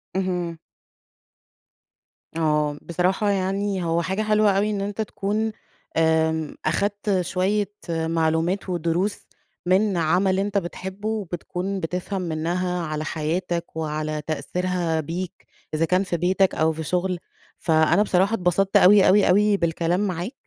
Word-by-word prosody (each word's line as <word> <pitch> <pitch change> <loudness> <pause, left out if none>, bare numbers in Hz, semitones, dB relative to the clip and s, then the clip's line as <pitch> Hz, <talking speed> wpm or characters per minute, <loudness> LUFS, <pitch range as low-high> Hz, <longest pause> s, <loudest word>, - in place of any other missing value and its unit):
اهم. 180 -3 -1 1.8
آه، 150 -2 +1
بصراحة 180 +4 0
يعني 195 0 0
هو 165 0 +1
حاجة 190 +5 -1
حلوة 215 -2 +3
أوي 205 +2 +2
إن 205 -2 -2
أنت 205 +2 -3
تكون، 215 +1 -2 0.5
آمم، 160 -1 +1
أخدت 200 +4 0
شوية 190 +3 0 0.2
معلومات 165 +3 0
ودروس 175 +3 -1 0.4
من 190 +1 +2
عمل 185 +4 +2
إنت 200 +1 0
بتحبه، 190 +3 -4
وبتكون 190 -1 -3
بتفهم 180 +3 -3
منها 175 +2 -1
على 155 0 -3
حياتك 170 +3 -2
وعلى 155 -1 -2
تأثيرها 175 0 -1
بيك، 170 +4 -5 0.3
إذا 160 +2 +2
كان 185 +3 +2
في 180 -3 -2
بيتك 185 +3 +2
أو 160 +1 +2
في 160 - -5
شُغل، 180 +3 -1 0.4
فأنا 160 +4 +3
بصراحة 195 +1 +2
اتبسطت 190 -1 +2
أوي، 195 +2 +7
أوي، 200 +2 +5
أوي 205 +2 +4
بالكلام 170 +1 0
معاك، 180 - -4
180 Hz, 125 wpm, -23 LUFS, 165-195 Hz, 1.8 s, أوي